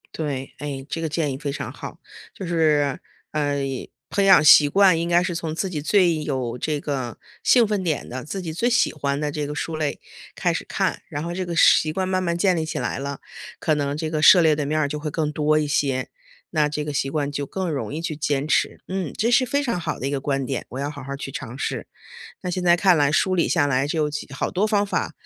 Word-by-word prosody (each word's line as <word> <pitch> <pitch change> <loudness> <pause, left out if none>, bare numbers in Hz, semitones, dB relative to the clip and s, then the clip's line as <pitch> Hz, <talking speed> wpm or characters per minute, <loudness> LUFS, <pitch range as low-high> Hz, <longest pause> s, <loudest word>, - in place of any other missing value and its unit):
对， 140 -4 -4
哎， 140 -2 -5
这 165 - -4
个 160 - -2
建 155 -2 -1
议 130 - -5
非 140 -1 -3
常 140 - -5
好， - - -8 0.4
就 190 - -6
是 155 -5 +2 0.3
呃， 145 -2 0 0.6
培 200 - +2
养 190 -6 +7
习 145 -1 +8
惯 190 0 +5
应 170 +1 -2
该 175 +1 +4
是 180 - -2
从 160 -1 -4
自 190 +2 -2
己 150 -4 -3
最 170 -2 +3
有 130 -5 -2
这 150 +3 -2
个 130 -5 -4 0.2
兴 235 -4 +5
奋 205 -3 -1
点 160 -5 -2
的， 130 +1 -6
自 195 +6 -5
己 165 -4 -5
最 235 +9 +1
喜 245 0 +2
欢 140 -2 -2
的 150 -1 -2
这 150 -1 -3
个 150 - -5
书 160 - -3
类 150 -2 -2 0.4
开 - - 0
始 - - -3
看， - - -1
然 145 +2 -4
后 170 - -4
这 185 +1 -2
个 170 - -3
是 - - +6
习 155 - -3
惯 185 +3 -2
慢 185 0 0
慢 170 -2 -1
建 185 -1 +3
立 160 - -1
起 160 - -4
来 - - -2
了， 140 0 -5 0.4
可 155 - 0
能 145 0 -1
这 155 0 -3
个 155 - -1
涉 180 - +8
猎 155 -2 +4
的 145 -2 -2
面 155 +1 0
儿 145 - +1
就 150 +1 -4
会 150 0 -3
更 150 -1 -1
多 150 0 +2
一 155 - +1
些， 140 -2 0 0.4
那 150 -2 +2
这 150 0 -3
个 150 - -4
习 135 -1 0
惯 145 -2 -1
就 145 -1 -3
更 190 -2 -3
容 140 -2 -3
易 155 - -4
去 165 -2 -3
坚 145 -1 -1
持。 - - +1
嗯， 185 -5 -3
这 230 +2 +1
是 250 +2 +5
非 285 0 0
常 235 -9 -1
好 160 -2 -3
的 130 - -4
一 140 - -2
个 140 - -2
观 135 -1 -1
点， 135 -1 -3
我 130 - -6
要 145 +1 -2
好 145 - -9
好 140 +1 -6
儿 140 - -5
去 135 - -6
尝 130 -2 -7
试。 - - -3 0.5
那 180 - -5
现 180 0 -2
在 175 -1 +6
看 180 0 +4
来 145 -1 +2
梳 185 +3 +2
理 170 - +2
下 145 - +2
来 135 0 +1
就 150 0 0 0.3
好 - - -2
多 195 +4 +1
方 205 -1 +1
法 - - -2
155 Hz, 280 characters per minute, -23 LUFS, 145-175 Hz, 0.6 s, 习